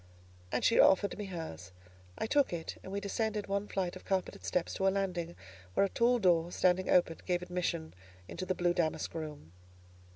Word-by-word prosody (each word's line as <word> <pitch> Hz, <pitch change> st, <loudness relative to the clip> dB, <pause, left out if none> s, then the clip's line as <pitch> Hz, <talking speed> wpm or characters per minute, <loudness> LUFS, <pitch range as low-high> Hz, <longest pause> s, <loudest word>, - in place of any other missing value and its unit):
And -, -, 0 dB
she 230 Hz, -, +4 dB
offered 200 Hz, +1 st, +5 dB
me 210 Hz, -, -5 dB
hers: 160 Hz, -, -7 dB, 0.5 s
I -, -, -1 dB
took 285 Hz, +4 st, +3 dB
it, 170 Hz, -2 st, -5 dB
and 190 Hz, -, -9 dB
we 200 Hz, -, -1 dB
descended 210 Hz, +1 st, -2 dB
one 200 Hz, +1 st, -1 dB
flight 185 Hz, -3 st, -2 dB
of 185 Hz, -, -10 dB
carpeted 190 Hz, -2 st, -2 dB
steps 180 Hz, -, -1 dB
to 195 Hz, -, +1 dB
a -, -, +7 dB
landing 180 Hz, -3 st, -2 dB, 0.4 s
where -, -, +5 dB
a -, -, -2 dB
tall 240 Hz, +4 st, +3 dB
door, 175 Hz, -5 st, +3 dB
standing 185 Hz, +1 st, +2 dB
open, 170 Hz, -2 st, +4 dB
gave 180 Hz, -1 st, +1 dB
admission 175 Hz, -2 st, -2 dB, 0.3 s
into 185 Hz, -, -5 dB
the 185 Hz, -, 0 dB
blue 175 Hz, 0 st, +2 dB
damask 165 Hz, -3 st, -1 dB
room. 150 Hz, -, -7 dB
180 Hz, 190 wpm, -32 LUFS, 170-200 Hz, 0.5 s, a